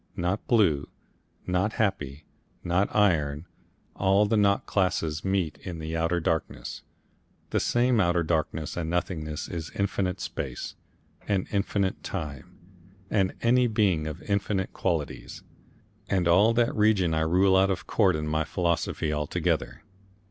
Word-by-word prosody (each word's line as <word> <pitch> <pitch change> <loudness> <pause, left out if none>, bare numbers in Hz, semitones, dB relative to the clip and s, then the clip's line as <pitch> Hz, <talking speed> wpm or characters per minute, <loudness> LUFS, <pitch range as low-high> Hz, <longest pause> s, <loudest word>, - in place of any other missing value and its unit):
Not 90 +4 -1
blue, 90 - +3 0.6
not 90 +4 0
happy, 80 -9 -2 0.4
not 90 +3 +2
iron, 80 -7 +2 0.5
all 95 +2 +3
the 105 - +1
not 100 -1 +3
classes 90 -5 0
meet 95 -5 -1
in 90 -3 -6
that 80 0 -4
Outer 85 +1 +1
Darkness. 80 -1 -3 0.7
That - - +2
same 120 -1 +2
Outer 85 -2 +2
Darkness 80 -1 -1
and 80 -2 -3
nothingness 80 -3 -2
is 80 -2 -5
infinite 100 -2 -1
space, - - -5 0.5
and 95 -3 +1
infinite 100 -1 0
time, 75 -8 -6 0.5
and 95 -3 +1
any 125 +1 +4
being 100 -8 +1
of 80 +2 -6
infinite 100 -1 -1
qualities, - - -3 0.7
and 90 -3 +1
all 100 +7 +5
that 120 0 +2
region 105 -6 +3
I 80 - +1
rule 95 +4 +3
out 95 +1 +4
of 95 - -2
court 95 -6 +3
in 75 0 -3
my 80 +1 +1
philosophy 85 -2 -1
altogether. 75 -1 -1
90 Hz, 135 wpm, -27 LUFS, 80-100 Hz, 0.7 s, all